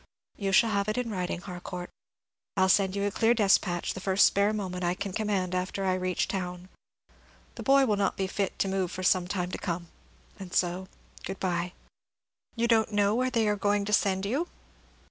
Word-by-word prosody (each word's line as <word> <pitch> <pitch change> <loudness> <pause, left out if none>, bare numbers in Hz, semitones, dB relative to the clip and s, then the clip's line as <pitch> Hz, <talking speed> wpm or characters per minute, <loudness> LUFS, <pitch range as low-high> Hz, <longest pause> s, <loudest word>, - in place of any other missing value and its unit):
"You 195 -2 -2
shall 225 +4 +5
have 200 0 0
it 215 - -1
in 245 -2 -1
writing, 180 -2 -3
Harcourt; 180 -1 -7 0.7
I'll 190 0 +4
send 190 0 +3
you 200 - -1
a 205 - 0
clear 225 +4 +3
despatch 195 -5 +2
the - - -6
first 190 +1 +4
spare 200 +1 +3
moment 185 -4 -3
I 175 +1 +1
can 200 +1 -4
command 195 -4 -1
after 185 +2 -2
I 185 - +2
reach 185 -1 -1
town. 180 -1 -4 0.8
The - - -8
boy 275 0 +5
will 210 -4 +1
not 200 - 0
be 195 - 0
fit 195 +1 -2
to - - 0
move 190 -2 -1
for 185 - -6
some 180 0 +3
time 180 -2 -2
to - - -4
come, 170 -2 -4 0.5
and 185 -2 -7
so 180 +1 0 0.4
good 190 0 -5
bye." 180 -1 -1 0.8
"You 235 0 +1
don't 225 -2 +3
know 205 0 +2
where 255 +3 +1
they 230 -3 +1
are 210 - +2
going 205 0 +1
to 210 - -2
send 195 -1 +2
you?" 275 +12 -1
195 Hz, 205 wpm, -28 LUFS, 185-210 Hz, 0.8 s, shall